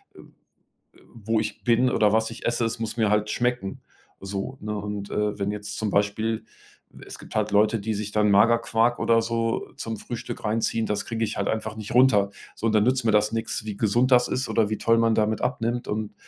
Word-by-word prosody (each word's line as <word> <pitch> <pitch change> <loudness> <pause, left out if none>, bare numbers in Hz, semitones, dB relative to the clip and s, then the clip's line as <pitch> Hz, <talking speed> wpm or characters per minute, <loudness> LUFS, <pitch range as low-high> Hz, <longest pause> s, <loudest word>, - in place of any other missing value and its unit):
äh, - - -15 0.8
äh, - - -21
wo 115 -1 -1
ich 110 - -5
bin 125 +1 +3
oder 105 -4 +3
was 110 0 +1
ich 115 - -7
esse, 120 0 +1
es 115 +2 -2
muss 115 0 -4
mir 110 -3 +2
halt 105 0 +1
schmecken 120 -4 -2 0.4
so, 100 +6 -5
ne? 105 0 -4
Und, 105 0 -5
äh, 105 0 -1
wenn 100 0 -1
jetzt 105 0 -6
zum 110 -2 -1
Beispiel 105 +3 0 0.6
es - - -9
gibt - - -12
halt 105 -1 0
Leute, 105 +2 +3
die 110 +2 -2
sich 105 0 -4
dann 105 -1 +3
Magerquark 115 +3 +3
oder 115 0 +3
so 115 0 -2
zum 115 -1 -4
Frühstück 120 +3 -7
reinziehen, 115 +1 0
das 105 -1 -2
kriege 115 -1 -2
ich 110 - -4
halt 100 - -1
einfach 110 0 -3
nicht 105 -2 -7
runter. 110 -6 +5 0.2
So - - -4
und 110 - +1
dann 105 -1 +4
nützt 130 +1 +1
mir 115 - +3
das 105 +1 +3
nix, 115 0 -3
wie 105 -2 -4
gesund 120 +5 +2
das 125 0 +5
ist 130 - -2
oder 110 -2 +1
wie 110 - -2
toll 115 0 +3
man 115 -1 +3
damit 110 0 0
abnimmt 120 -2 -2
und 105 0 -3
110 Hz, 220 wpm, -25 LUFS, 105-115 Hz, 0.8 s, runter